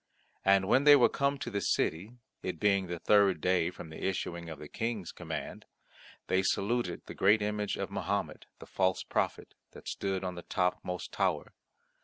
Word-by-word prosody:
And 95 -1 +4
when 130 +6 +4
they 145 0 +9
were 130 - +5
come 140 0 0
to 120 - -5
the 100 -1 -1
city, 95 +5 0 0.3
it 90 -3 -4
being 100 -1 +2
the 85 0 -4
third 100 -1 +4
day 90 0 +2
from 85 -3 -10
the 80 - -8
issuing 85 -3 -3
of 80 - -7
the 75 - -9
King's 110 -3 -3
command, - - -6 0.6
they 95 - +2
saluted 100 0 -1
the - - -8
great 105 +2 +4
image 105 -1 -2
of - - -4
Mahomet, - - -3
the - - -11
false 95 -1 0
prophet, - - -2 0.2
that - - -12
stood 95 -1 -2
on 90 -1 -3
the 90 - -7
topmost 90 0 -2
tower. - - -1
95 Hz, 180 wpm, -31 LUFS, 90-105 Hz, 0.6 s, they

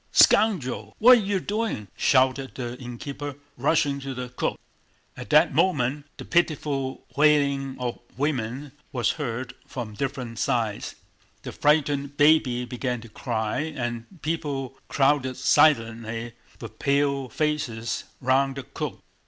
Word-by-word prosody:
"Scoundrel, 190 - +3
what 245 +2 +8
are - - -1
you 200 -1 0
doing?" 205 - -2
shouted 130 0 +2
the 120 -2 -4
innkeeper, 140 +3 -6 0.2
rushing 140 +1 +1
to 135 -1 -6
the 125 0 -5
cook. 125 - -2 0.6
At - - -9
that 155 +3 +5
moment 145 -3 +1
the - - -8
pitiful 145 -5 0
wailing 140 -2 +3
of 125 -1 -3 0.2
women 135 -1 -2 0.2
was 120 -3 +1
heard 125 -4 -4
from 115 -4 -6
different 125 -2 -4
sides, 110 -2 -1 0.5
the - - -6
frightened 145 -1 +1
baby 145 -5 +4
began 125 0 -3
to 115 - -12
cry, 110 -1 -2
and 130 0 -5
people 145 -5 -3
crowded 135 -2 +2
silently 115 -4 +2 0.3
with - - -10
pale 140 -1 +1
faces 130 -8 -2 0.2
round 135 +1 +2
the 135 - -5
cook. - - -6
135 Hz, 130 wpm, -25 LUFS, 120-150 Hz, 0.6 s, what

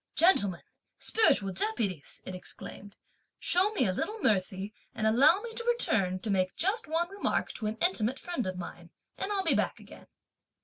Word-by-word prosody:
"Gentlemen, 205 - +4 0.3
spiritual 205 - +3
deputies," 195 -5 -2
it 185 - -6
exclaimed; 200 +2 -9 0.4
"show 370 +4 +2
me 370 - +2
a 185 - +1
little 425 - -3
mercy 195 0 0 0.2
and 220 - -2
allow 275 - +5
me 460 0 -7
to 470 - -2
return 220 - +2
to 215 - -2
make 185 -1 0
just 390 +4 0
one 330 +2 0
remark 400 - -1
to 215 - -5
an 215 +1 -3
intimate 265 - +1
friend 300 - -4
of 185 -1 -4
mine, 175 - -8 0.3
and 400 - -3
I'll 395 -2 +2
be 330 - +4
back - - 0
again." - - -14
225 Hz, 175 wpm, -30 LUFS, -, 0.4 s, allow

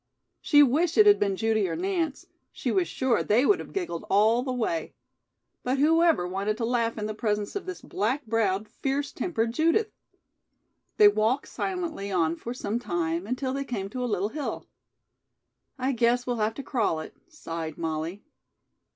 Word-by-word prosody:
She 290 -1 +6
wished 310 +6 +2
it 430 - +8
had 410 -1 +6
been 200 -1 +1
Judy 220 -2 +1
or - - -2
Nance. 345 -6 -2 0.3
She - - -3
was 370 -3 +1
sure 260 -3 +1
they 235 +6 +3
would 405 - +4
have - - -8
giggled 355 - -3
all 220 +4 +4
the 255 0 -3
way. 220 -10 -2 0.7
But 255 +2 -1
who 320 +4 +4
ever 325 - +3
wanted 200 +3 -2
to 230 - -1
laugh 230 -1 0
in 210 - -3
the 215 - -3
presence 210 -1 -2
of 400 - -4
this 370 - -6
black 240 +9 -2
browed, 215 -2 0
fierce 275 +4 -2
tempered 230 -10 -1
Judith? 335 - +2 1.1
They 420 - +8
walked 255 - +1
silently 335 - -3
on 165 -3 +1
for 230 - -7
some 235 -2 -3
time, 175 -4 -2
until 255 +2 -2
they 275 0 -2
came 205 -7 -4
to 255 +1 -3
a 245 - -1
little 205 -1 0
hill. 295 +3 -4 1.1
"I 260 0 0
guess 245 0 +2
we'll 245 -1 -1
have 215 0 0
to 275 - -6
crawl 225 - 0
it," - - -10
sighed 165 - -6
Molly. 165 +4 -3
235 Hz, 180 wpm, -27 LUFS, 205-290 Hz, 1.1 s, it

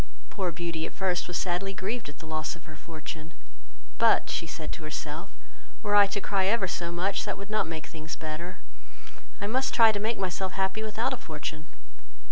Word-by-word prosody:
Poor 185 -4 0
Beauty 170 -1 -2
at - - -10
first 185 -2 +1
was 180 - -1
sadly 190 +2 0
grieved 200 0 -2
at 145 - -10
the 160 - -10
loss 155 +1 -1
of 170 - -15
her 155 - -10
fortune; 160 0 -7 0.6
"but, - - +5
(she 165 - -1
said 160 -1 -4
to - - -6
herself,) 155 +3 -4 0.5
were 205 -1 +1
I 205 -1 +9
to 200 +1 -1
cry 195 -1 +2
ever 205 -2 +4
so 170 -1 -2
much, 190 +3 +1
that 205 - -2
would 200 +1 -7
not 215 -5 +2
make 160 -2 -4
things 160 0 -6
better, 160 +3 -5 0.8
I 200 - -1
must 260 +6 +1
try 225 -2 +9
to 205 - -1
make 220 +2 +1
myself 190 0 -1
happy 190 +2 +1
without 220 +4 0
a - - -2
fortune." 155 -3 -5
185 Hz, 200 wpm, -29 LUFS, 160-205 Hz, 0.8 s, I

